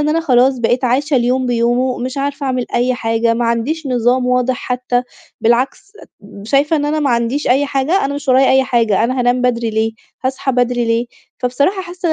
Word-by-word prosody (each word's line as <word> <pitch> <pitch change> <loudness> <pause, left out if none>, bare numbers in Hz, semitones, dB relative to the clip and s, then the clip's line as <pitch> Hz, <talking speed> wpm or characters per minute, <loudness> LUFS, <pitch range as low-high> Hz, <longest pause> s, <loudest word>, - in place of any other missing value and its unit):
إن 295 - 0
أنا 325 +2 +1
خلاص 260 -3 +3
بقيت 245 +2 0
عايشة 275 +4 +1
اليوم 250 +1 +1
بيومه، 245 +1 0
مش 255 +3 -4
عارفة 280 0 -3
أعمل 255 -2 -1
أي 250 +1 +1
حاجة، 230 -1 0
ما 240 - -1
عنديش 240 +8 -1
نظام 250 0 +1
واضح 250 0 +1
حتّى، 250 -1 -2 0.4
بالعكس 255 - 0 0.5
شايفة 280 +7 +1
إن 290 - -1
أنا 305 +1 -1
ما 285 -3 +1
عنديش 235 +5 0
أي 270 +4 +3
حاجة، 280 +7 0
أنا 280 +1 -2
مش 285 -1 -7
ورايا 260 +1 +4
أي 265 0 +4
حاجة، 230 -5 +1
أنا 255 +2 -1
هانام 245 +1 +1
بدري 235 -2 0
ليه، 220 +1 -1 0.3
هاصحى 265 +1 -1
بدري 245 -1 +1
ليه؟ 230 +1 0 0.3
فبصراحة 280 +10 0
حاسّة 350 -2 -3
255 Hz, 195 wpm, -16 LUFS, 240-275 Hz, 0.5 s, ورايا